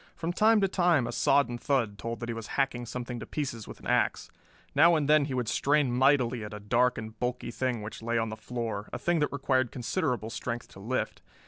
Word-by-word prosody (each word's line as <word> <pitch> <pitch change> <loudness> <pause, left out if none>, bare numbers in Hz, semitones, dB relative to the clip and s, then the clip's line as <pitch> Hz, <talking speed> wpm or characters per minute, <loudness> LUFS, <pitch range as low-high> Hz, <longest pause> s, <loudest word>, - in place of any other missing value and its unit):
From 170 +1 -3
time 220 +3 +5
to 195 - +4
time 175 -8 +3
a 120 - -3
sodden 120 -1 +2
thud 115 -8 0
told 115 +1 -5
that 120 - -4
he - - -1
was 115 -1 -6
hacking 125 -3 0
something 125 0 -5
to - - -8
pieces 125 -8 -4
with - - -10
an - - -15
ax. - - +1 0.4
Now 165 +4 +6
and 150 -3 +1
then 150 -1 +5
he 135 -2 -3
would 125 -2 -1
strain 145 +2 +2
mightily 130 -3 +3
at 105 0 -7
a - - -7
dark 125 +4 +2
and 110 0 -7
bulky 125 -1 -2
thing 125 -2 -2
which 105 - -7
lay 115 +1 -1
on 115 -1 0
the 110 - -5
floor, 110 -2 -4
a - - -3
thing 175 -1 +1
that 150 - +1
required 130 -3 +1
considerable 120 -2 -2
strength 120 0 -4
to - - -13
lift. 120 +6 -2
125 Hz, 230 wpm, -29 LUFS, 115-140 Hz, 0.4 s, Now